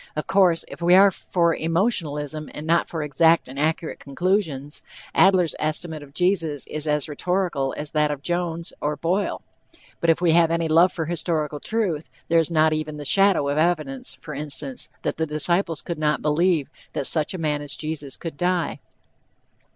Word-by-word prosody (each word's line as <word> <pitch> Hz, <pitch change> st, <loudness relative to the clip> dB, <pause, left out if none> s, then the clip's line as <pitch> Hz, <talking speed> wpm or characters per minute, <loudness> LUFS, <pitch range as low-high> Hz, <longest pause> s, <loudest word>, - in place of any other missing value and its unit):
Of 155 Hz, -, -3 dB
course, 185 Hz, -4 st, +3 dB
if -, -, -10 dB
we 175 Hz, +1 st, +5 dB
are 195 Hz, +1 st, +7 dB
for 170 Hz, -2 st, 0 dB
emotionalism 160 Hz, -, -1 dB
and 150 Hz, -, -6 dB
not 170 Hz, +1 st, +2 dB
for 160 Hz, -3 st, -3 dB
exact 160 Hz, +3 st, +3 dB
and 135 Hz, +2 st, -8 dB
accurate 160 Hz, +2 st, -1 dB
conclusions, 150 Hz, -2 st, -1 dB, 0.3 s
Adler's 185 Hz, -4 st, +4 dB
estimate 155 Hz, 0 st, -2 dB
of 140 Hz, 0 st, -14 dB
Jesus 165 Hz, -6 st, +1 dB
is 155 Hz, 0 st, -5 dB
as 150 Hz, -1 st, +1 dB
rhetorical 165 Hz, -3 st, -1 dB
as 150 Hz, 0 st, -5 dB
that 150 Hz, -1 st, +2 dB
of 145 Hz, -1 st, -4 dB
Jones 175 Hz, -1 st, -2 dB
or 150 Hz, +1 st, -1 dB
Boyle, 180 Hz, +6 st, -1 dB, 0.6 s
but 170 Hz, -, 0 dB
if 165 Hz, -, +4 dB
we 175 Hz, -2 st, +3 dB
have 165 Hz, 0 st, +5 dB
any 165 Hz, 0 st, 0 dB
love 170 Hz, +3 st, +5 dB
for 160 Hz, -, -3 dB
historical 155 Hz, -3 st, -1 dB
truth, 185 Hz, -6 st, -2 dB, 0.2 s
there 165 Hz, 0 st, +5 dB
is 165 Hz, -, +1 dB
not 155 Hz, -1 st, +3 dB
even 155 Hz, -1 st, -3 dB
the 145 Hz, -, -7 dB
shadow 195 Hz, -3 st, +4 dB
of 145 Hz, +2 st, 0 dB
evidence, 155 Hz, -5 st, -1 dB
for 150 Hz, -, -9 dB
instance, 140 Hz, -2 st, -3 dB
that -, -, -2 dB
the 160 Hz, 0 st, -1 dB
disciples 165 Hz, +3 st, 0 dB
could 170 Hz, -3 st, -5 dB
not 150 Hz, -1 st, 0 dB
believe 155 Hz, 0 st, +1 dB, 0.2 s
"that -, -, -2 dB
such 155 Hz, +5 st, 0 dB
a -, -, -3 dB
man 150 Hz, -3 st, -1 dB
as 145 Hz, -3 st, -3 dB
Jesus 150 Hz, -3 st, -5 dB
could 165 Hz, -4 st, -7 dB
die." 175 Hz, -1 st, 0 dB
160 Hz, 180 wpm, -23 LUFS, 150-175 Hz, 0.6 s, are